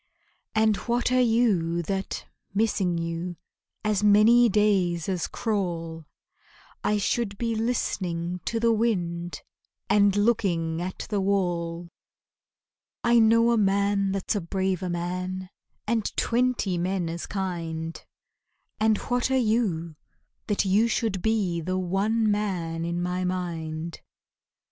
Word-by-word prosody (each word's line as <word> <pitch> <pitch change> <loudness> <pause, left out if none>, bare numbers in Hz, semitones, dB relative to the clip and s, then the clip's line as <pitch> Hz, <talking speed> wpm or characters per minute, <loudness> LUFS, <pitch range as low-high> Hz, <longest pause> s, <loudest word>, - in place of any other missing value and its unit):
And 220 -1 +3
what 240 +6 0
are 255 0 +4
you 205 -8 +2
that, 190 +3 -3 0.3
missing 195 -5 +1
you, 170 +1 -3 0.5
As 210 -1 +1
many 220 +4 +6
days 190 -5 +2
as 185 -3 -1
crawl 170 -7 -3 0.8
I 210 - +2
should 205 0 -1
be 230 +1 -1
listening 180 -7 -1
to 230 - -1
the 230 0 +3
wind 175 -6 -1 0.5
And 200 -1 +4
looking 180 -7 +1
at 185 +1 -5
the 205 -2 +1
wall? 175 -3 -1 1.2
I 235 0 +5
know 230 +1 +5
a 235 - +3
man 200 0 +2
that's 195 +2 -1
a 205 - 0
braver 185 +1 -1
man 180 +2 -3 0.3
And 225 -1 0
twenty 235 -7 +1
men 180 0 -1
as 170 +1 -5
kind, 165 -4 -4 0.8
And 215 0 +3
what 245 +1 -1
are 265 - +2
you, 205 -10 0 0.5
that 205 -1 +1
you 205 +4 +3
should 220 -5 -1
be 200 -6 0
The 185 +3 -2
one 205 +5 +1
man 175 -6 -2
in 170 +1 -2
my 180 +1 -1
mind? 170 -3 -4
195 Hz, 125 wpm, -26 LUFS, 175-220 Hz, 1.2 s, many